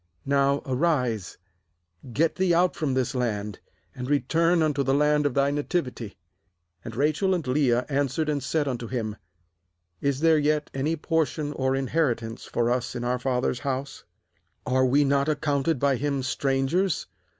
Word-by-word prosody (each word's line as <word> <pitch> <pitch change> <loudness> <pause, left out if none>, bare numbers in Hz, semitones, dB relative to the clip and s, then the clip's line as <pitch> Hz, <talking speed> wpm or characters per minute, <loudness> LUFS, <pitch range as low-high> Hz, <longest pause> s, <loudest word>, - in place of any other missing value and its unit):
Now 140 0 +2
arise, 125 - 0 0.7
get 155 +6 +2
thee 185 -2 +2
out 180 +1 +3
from 145 -5 -1
this 130 +1 0
land, 105 -5 -2 0.3
and 125 +1 -6
return 165 +5 +2
unto 150 -3 +1
the 135 0 +1
land 150 0 +3
of 135 - -4
thy 140 0 +3
nativity/ 145 - -3 0.7
14And 115 - -7
Rachel 155 - +1
and 170 - -3
Leah 125 -2 +2
answered 140 +2 0
and 145 -2 0
said 145 +2 -1
unto 120 -3 -3
him: 110 -4 -3 0.9
'Is 140 0 0
there 160 -1 +5
yet 150 0 0
any 145 +5 0
portion 155 -2 -1
or 130 -1 0
inheritance 125 -5 -1
for 120 0 0
us 125 +1 -1
in 120 - -3
our 125 +1 0
father's 125 -1 -1
house? 135 0 -4 0.6
15Are 130 0 +2
we 145 +3 +4
not 140 +1 +2
accounted 145 0 0
by 140 0 +2
him 140 0 -1
strangers? 135 +7 0
140 Hz, 155 wpm, -26 LUFS, 125-150 Hz, 0.9 s, there